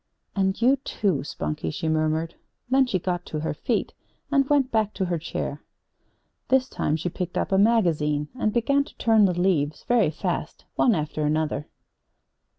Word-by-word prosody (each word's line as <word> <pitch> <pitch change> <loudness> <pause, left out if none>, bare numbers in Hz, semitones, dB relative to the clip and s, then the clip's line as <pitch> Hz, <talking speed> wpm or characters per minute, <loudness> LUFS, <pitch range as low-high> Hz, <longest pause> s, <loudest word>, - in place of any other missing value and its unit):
"And 190 -1 +1
you, 255 +4 +4
too, 200 - -1
Spunkie," 75 - -4
she 160 - -3
murmured. 155 +1 0 0.4
Then 265 0 +4
she 205 - +1
got 175 0 -2
to 155 - -4
her 160 - -2
feet 230 +9 -2 0.4
and 275 -2 +3
went 280 -3 +3
back 215 -2 +1
to 190 - -1
her 175 -2 -1
chair. 155 - -4 0.9
This 260 0 +3
time 155 - -1
she 160 +2 -3
picked 175 0 -4
up - - -1
a 190 - +4
magazine 160 -9 +2
and 235 -4 0
began 280 +5 +2
to - - -17
turn 225 -3 +4
the 180 -2 0
leaves 155 -5 +1
very 240 -9 +3
fast, 155 - -4
one 235 - +3
after 155 -1 -2
another. 150 -1 0
180 Hz, 170 wpm, -25 LUFS, 155-230 Hz, 0.9 s, you